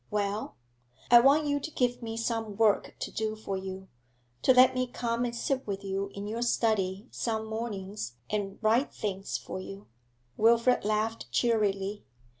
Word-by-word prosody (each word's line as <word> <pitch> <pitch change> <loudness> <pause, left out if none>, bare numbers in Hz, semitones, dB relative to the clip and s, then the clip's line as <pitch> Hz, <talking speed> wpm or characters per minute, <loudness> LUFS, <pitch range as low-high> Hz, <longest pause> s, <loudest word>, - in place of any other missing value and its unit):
'Well?' 205 +1 -2 0.6
'I 240 - +10
want 280 +5 +5
you 285 0 +1
to 300 - -5
give 250 -5 0
me 225 -1 -5
some 225 -3 -2
work 220 -2 +2
to - - -5
do 220 0 -2
for 215 -2 -4
you 190 0 -6 0.5
to - - +5
let 255 0 +7
me 255 0 0
come 240 0 -1
and 235 -1 -3
sit 260 +2 -1
with 200 -1 -3
you 195 0 -2
in 200 0 -5
your 225 +3 -3
study 215 -3 +1
some 220 -2 -2
mornings 205 - -5
and 200 -2 -3
'write 230 +6 +3
things 195 -2 -3
for - - -7
you.' 195 +2 -9 0.5
Wilfrid 235 +3 +4
laughed 215 +2 -1
cheerily. 205 -3 +1
220 Hz, 165 wpm, -29 LUFS, 200-235 Hz, 0.6 s, I